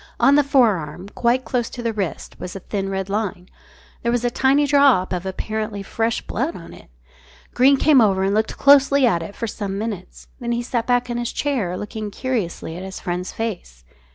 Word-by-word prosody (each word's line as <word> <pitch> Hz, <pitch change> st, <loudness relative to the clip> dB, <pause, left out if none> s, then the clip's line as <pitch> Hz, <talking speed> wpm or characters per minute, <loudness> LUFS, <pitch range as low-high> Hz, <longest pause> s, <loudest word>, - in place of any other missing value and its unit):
On 275 Hz, -, +5 dB
the 290 Hz, 0 st, +5 dB
forearm, 200 Hz, -, +1 dB
quite 245 Hz, +4 st, 0 dB
close 245 Hz, -3 st, -1 dB
to 240 Hz, -, -7 dB
the 230 Hz, -1 st, -1 dB
wrist, 190 Hz, -9 st, -4 dB
was 180 Hz, -, -7 dB
a -, -, -5 dB
thin 195 Hz, +1 st, -3 dB
red 195 Hz, -1 st, -3 dB
line. 200 Hz, -3 st, -3 dB, 0.5 s
There 235 Hz, -, 0 dB
was 245 Hz, 0 st, 0 dB
a 240 Hz, -, +1 dB
tiny 270 Hz, +4 st, +3 dB
drop 275 Hz, -10 st, +4 dB
of 180 Hz, +1 st, -3 dB
apparently 215 Hz, +1 st, -4 dB
fresh 225 Hz, +3 st, -1 dB
blood 270 Hz, +9 st, -2 dB
on 165 Hz, -, -10 dB
it. -, -, -15 dB, 0.6 s
Greene 270 Hz, +3 st, +5 dB
came 285 Hz, -2 st, +5 dB
over 195 Hz, -3 st, +3 dB
and 195 Hz, +1 st, +1 dB
looked 220 Hz, +1 st, 0 dB
closely 280 Hz, -1 st, +5 dB
at 175 Hz, -8 st, +2 dB
it 165 Hz, +5 st, -8 dB
for -, -, -3 dB
some 205 Hz, -3 st, -4 dB
minutes. 205 Hz, -4 st, -6 dB
Then 240 Hz, -1 st, -2 dB
he 240 Hz, 0 st, -1 dB
sat 235 Hz, -1 st, -2 dB
back 245 Hz, 0 st, +1 dB
in 240 Hz, -, -2 dB
his 240 Hz, 0 st, -2 dB
chair, 230 Hz, -12 st, -1 dB
looking 210 Hz, +1 st, -5 dB
curiously 205 Hz, -8 st, -3 dB
at 180 Hz, -, -7 dB
his 190 Hz, 0 st, -7 dB
friend's 180 Hz, +1 st, -3 dB
face. 175 Hz, -, -5 dB
220 Hz, 205 wpm, -21 LUFS, 190-250 Hz, 0.6 s, On